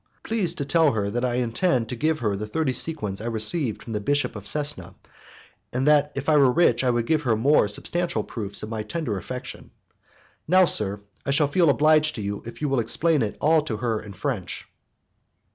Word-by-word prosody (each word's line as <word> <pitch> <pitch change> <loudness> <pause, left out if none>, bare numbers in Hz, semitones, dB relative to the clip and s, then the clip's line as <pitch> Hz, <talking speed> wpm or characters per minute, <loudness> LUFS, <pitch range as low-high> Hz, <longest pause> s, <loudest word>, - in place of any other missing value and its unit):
Please 195 -7 -1
to 140 - -4
tell 160 -1 +3
her 100 -2 -1
that 120 +3 -2
I 125 -1 0
intend 125 +1 0
to - - -3
give 155 +5 0
her 105 -3 0
the 105 +2 -5
thirty 130 +4 -1
sequins 120 -8 -1
I 115 - -4
received 115 +3 0
from 115 - -7
the 105 - -2
Bishop 145 +5 0
of 105 -1 -8
Cesena, 150 +5 -2 0.8
and 130 +2 -1
that 150 -1 +4
if 140 0 -4
I 155 -1 +4
were 135 -3 +5
rich 125 -5 +3
I 130 - +2
would 120 -1 0
give 155 +4 +1
her 120 -6 +1
more 130 +1 +3
substantial 170 +3 -2
proofs 100 -3 -5
of 105 - -5
my 110 -1 -3
tender 110 +1 -3
affection. 125 +7 -8 0.8
Now, 185 +3 +5
sir, 105 - +1 0.2
I - - -5
shall 145 +1 +3
feel 170 +1 +3
obliged 155 +1 +3
to 110 - -5
you 100 0 -4
if 120 - -8
you - - +1
will 135 -2 +1
explain 155 +6 +1
it 105 -2 -2
all 160 +1 +4
to 120 -8 -4
her 110 -1 -1
in 105 -2 -10
French." 95 -1 -4
125 Hz, 210 wpm, -24 LUFS, 110-155 Hz, 0.8 s, were